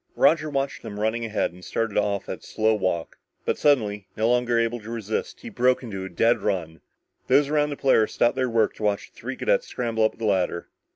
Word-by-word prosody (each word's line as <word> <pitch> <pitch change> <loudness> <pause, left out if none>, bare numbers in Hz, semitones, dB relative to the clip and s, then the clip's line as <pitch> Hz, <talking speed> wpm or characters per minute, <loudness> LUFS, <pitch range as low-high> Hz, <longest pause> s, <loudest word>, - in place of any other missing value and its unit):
Roger 155 -1 +3
watched 140 -1 -2
them 105 -1 -7
running 110 +2 0
ahead 105 -5 -1
and 90 0 -15
started 115 +1 -2
off 100 -1 0
at - - -5
a - - -35
slow 110 0 +1
walk, 95 -5 -2 0.3
but - - +1
suddenly, 105 -8 +2
no 110 +1 +2
longer 120 0 +2
able 115 +1 0
to 110 +1 -11
resist, 110 -2 -4
he 240 - -7
broke 130 - +2
into 100 -6 -5
a - - -6
dead 115 +7 +2
run. 85 -6 -2 0.5
Those 145 -1 +4
around 150 -1 +2
the 145 - -5
Polaris 120 -5 +3
stopped 120 +2 +3
their 130 -1 0
work 115 -2 +2
to - - -7
watch 105 -1 -1
the - - -37
three - - -6
cadets - - +1
scramble 115 -2 -1
up 110 - +1
the 115 - -4
ladder. 95 -4 0
115 Hz, 225 wpm, -25 LUFS, 105-125 Hz, 0.5 s, Those